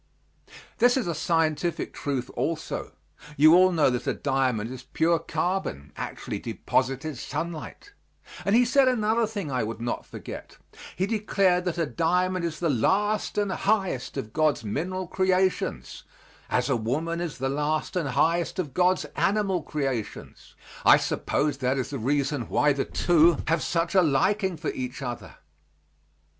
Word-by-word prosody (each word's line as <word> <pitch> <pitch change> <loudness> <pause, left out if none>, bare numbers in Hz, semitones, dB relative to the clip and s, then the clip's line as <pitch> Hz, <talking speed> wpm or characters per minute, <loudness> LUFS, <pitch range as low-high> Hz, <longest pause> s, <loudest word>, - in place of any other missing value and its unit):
This 245 +2 +5
is 255 - 0
a 170 - -1
scientific 160 +1 0
truth 135 -4 -3
also. 160 -1 -3 0.4
You 155 +2 +7
all 185 +1 +6
know 155 -6 +3
that 125 - -3
a - - +1
diamond 130 -5 0
is 130 -1 -7
pure 160 +5 +1
carbon, 170 - -3
actually - - -5
deposited 135 +2 -2
sunlight 170 - -6 0.5
and 200 +2 +2
he 245 +1 +5
said 270 +2 +4
another 225 -2 +2
thing 205 -9 -5
I 125 -2 0
would 110 +1 -4
not 120 +1 -3
forget: - - -9 0.4
he 185 - 0
declared 195 -4 +1
that 175 -2 -2
a 165 - +1
diamond 180 +3 0
is 165 -2 -3
the 170 - 0
last 200 - +1
and 205 -2 +1
highest 190 - -1
of 110 0 -5
God's 155 -5 +1
mineral 180 - -3
creations, 185 - 0 0.5
as 125 0 +1
a 135 - +2
woman 155 +10 -2
is 170 -4 -4
the 135 - -1
last 150 +6 -1
and 165 -6 0
highest 165 +6 +1
of 155 -8 -3
God's 180 +3 +2
animal 195 -3 +1
creations. 135 -7 -5 0.3
I - - +8
suppose 140 -1 -1
that 130 +1 0
is 130 - -3
the 140 - -4
reason 140 +1 -1
why 145 0 +3
the 135 -1 -1
two 170 -2 +4
have 160 0 +1
such 165 0 -1
a 190 - +6
liking 185 +5 +1
for 155 0 -3
each 130 +1 -5
other. 120 -2 -6
160 Hz, 155 wpm, -26 LUFS, 135-185 Hz, 0.5 s, I